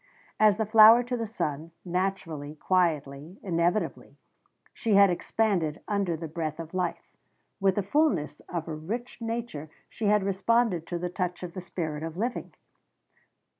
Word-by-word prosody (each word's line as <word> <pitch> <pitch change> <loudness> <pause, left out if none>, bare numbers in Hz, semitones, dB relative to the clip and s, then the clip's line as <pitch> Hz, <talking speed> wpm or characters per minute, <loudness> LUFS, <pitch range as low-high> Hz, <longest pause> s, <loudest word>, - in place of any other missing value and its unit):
As 215 -2 +5
the 220 - 0
flower 220 +2 +8
to 245 +1 -3
the 230 -2 -3
sun, 160 -6 -4
naturally, 170 -5 -3
quietly, 155 -2 0
inevitably, 175 +2 -1 0.6
she 220 -3 0
had 200 -1 +7
expanded 175 -4 0
under 200 -5 0
the 165 +1 -6
breath 155 0 -4
of 165 +1 -7
life. 180 -2 -3 0.4
With 195 -2 +2
the 205 - 0
fullness 200 - +1
of 170 -2 -4
a 160 - -4
rich 220 +12 -6
nature 230 -10 -4 0.2
she 225 - -5
had 210 -1 +4
responded 195 -2 +1
to 175 - -3
the 180 +1 -3
touch 180 0 -3
of 175 -1 -6
the 185 - -6
spirit 160 -4 -4
of 165 +1 -6
living. 240 +5 -3
180 Hz, 155 wpm, -28 LUFS, 165-215 Hz, 0.6 s, flower